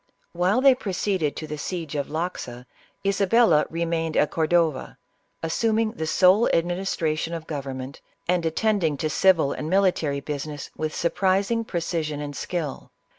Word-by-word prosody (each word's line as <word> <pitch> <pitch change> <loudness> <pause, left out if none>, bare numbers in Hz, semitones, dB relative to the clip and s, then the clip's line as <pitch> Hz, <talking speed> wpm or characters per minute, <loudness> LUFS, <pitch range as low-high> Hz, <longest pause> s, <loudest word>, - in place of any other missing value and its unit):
While 185 +8 +2
they 270 0 +7
proceeded 190 - -1
to 155 - -5
the 150 -1 -6
siege 165 -1 -4
of 145 -2 -2
Loxa, 155 -7 -4 0.4
Isabella 195 -4 +4
remained 165 -1 -1
at 150 - +3
Cordova, 160 -3 +1 0.5
assuming 220 +6 +1
the 160 -9 -4
sole 185 +7 +4
administration 170 -2 -1
of 165 -1 -7
government, 135 -3 -6 0.3
and 180 -1 +1
attending 165 -2 +1
to 155 +2 -2
civil 165 -3 +3
and 155 - -5
military 180 -7 +2
busi 145 +1 -4
ness 145 -1 -7
with 155 -1 -3
surprising 195 +6 +1
precision 165 -6 -2
and 145 -1 -5
skill. 160 -4 -4
165 Hz, 140 wpm, -24 LUFS, 150-190 Hz, 0.5 s, they